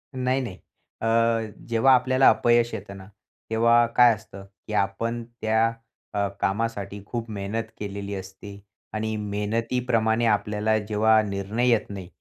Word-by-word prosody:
नाही, 130 +1 0
नाही. 115 -8 -6 0.5
अ, 115 - -1 0.6
जेव्हा 120 +3 +4
आपल्याला 130 +1 +4
अपयश 120 -1 +3
येतं 100 -2 -7
ना 95 -1 -12 0.4
तेव्हा 115 +1 +4
काय 120 -1 +7
असतं, 100 -2 -12 0.2
की 110 - -5
आपण 115 +4 -1 0.2
त्या 110 +1 +2 0.4
अ, 100 0 +1
कामासाठी 100 -1 -2
खूप 115 +1 -5
मेहनत 100 +3 -3 0.2
केलेली 100 0 -5
असते 95 +1 -9 0.4
आणि 110 0 -2
मेहनतीप्रमाणे 110 +2 0
आपल्याला 105 0 +1
जेव्हा 110 +1 +3
निर्णय 100 +5 -1
येत 115 -3 +2
नाही. 95 -3 -7
110 Hz, 135 wpm, -25 LUFS, 100-115 Hz, 0.6 s, काय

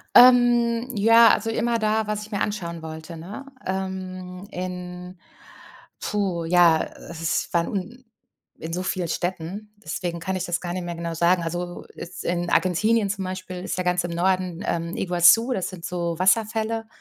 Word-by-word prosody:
Ähm, 240 -1 +6
ja, 230 +2 +7
also 225 - +2
immer 230 +1 0
da, 215 0 +1
was 210 0 -2
ich 215 - -10
mir 200 - -1
anschauen 170 -5 -3
wollte, 160 +1 -8
ne? 195 +12 -8 0.2
Ähm, 185 0 -5
in 180 0 -6 0.8
puh, 195 -5 -1
ja, 170 -1 +5
äh, - - -12
s 165 -1 -1
ich - - -20
war 170 0 +3
un 225 +6 -5 0.5
in 160 - -6
so 180 +2 -2
vielen 185 -2 -2
Städten, 185 +5 -4
deswegen 175 -4 -4
kann 190 +3 -2
ich 185 - -2
das 175 -1 -1
gar 175 -1 -4
nicht 185 - -3
mehr 175 0 -4
genau 170 0 -4
sagen. 170 +2 +3
Also, 175 +1 -4
jetzt 175 +2 -8
in 175 0 -1
Argentinien 205 +5 +2
zum 195 -1 -2
Beispiel 185 -1 -6
ist - - -3
ja - - +1
ganz 180 0 +1
im 175 - -3
Norden, 185 0 0
ähm, 170 0 -2
Iguazú, 185 +7 +5
das 190 -6 -2
sind 180 -3 -10
so 170 -1 -2
Wasserfälle. 220 +3 +1
185 Hz, 175 wpm, -24 LUFS, 175-210 Hz, 0.8 s, ja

